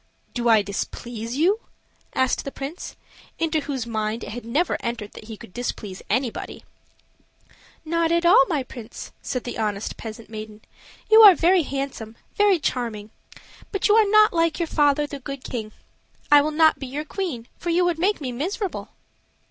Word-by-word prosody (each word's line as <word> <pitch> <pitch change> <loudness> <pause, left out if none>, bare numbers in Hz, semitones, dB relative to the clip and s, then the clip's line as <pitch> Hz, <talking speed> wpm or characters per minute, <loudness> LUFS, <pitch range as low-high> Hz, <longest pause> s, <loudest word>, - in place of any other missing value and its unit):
"Do 240 -1 0
I 220 -2 +6
displease 225 +3 -5
you?" 375 +8 +3 0.6
asked 260 -1 +1
the 275 - -5
prince, 280 +7 -7 0.4
into 320 -1 +1
whose 275 -5 -4
mind 220 0 -2
it - - -6
had 240 +1 -7
never 295 +10 +1
entered 235 -4 -4
that - - -12
he 220 -1 -8
could 185 - -13
displease 210 -5 -5
anybody. 245 +2 -2 1.2
"Not 335 +1 +1
at 340 0 +2
all, 340 -5 +7
my 295 -5 -1
prince," 240 -3 -9
said 250 - -3
the 245 - -5
honest 210 -1 -2
peasant 220 0 -8
maiden. 215 -1 -8 0.5
"You 440 +1 +9
are 405 -4 +10
very 355 +3 +4
handsome, 270 -6 -5 0.2
very 410 -2 +4
charming; 230 -8 -3 0.6
but 395 - +1
you 415 - +5
are 435 -2 +5
not 430 0 +6
like 330 -1 +1
your 340 - +1
father 295 -2 +2
the 285 -1 -7
Good 275 0 -7
King. 220 -3 -5 0.6
I 290 0 +9
will 300 - 0
not 315 +1 +4
be 270 - -5
your 290 +4 -4
queen, 305 - -4
for 345 - -4
you 350 +1 +3
would 345 -2 0
make 400 +4 +1
me 265 -4 -4
miserable." 370 - -3
275 Hz, 175 wpm, -23 LUFS, 230-335 Hz, 1.2 s, are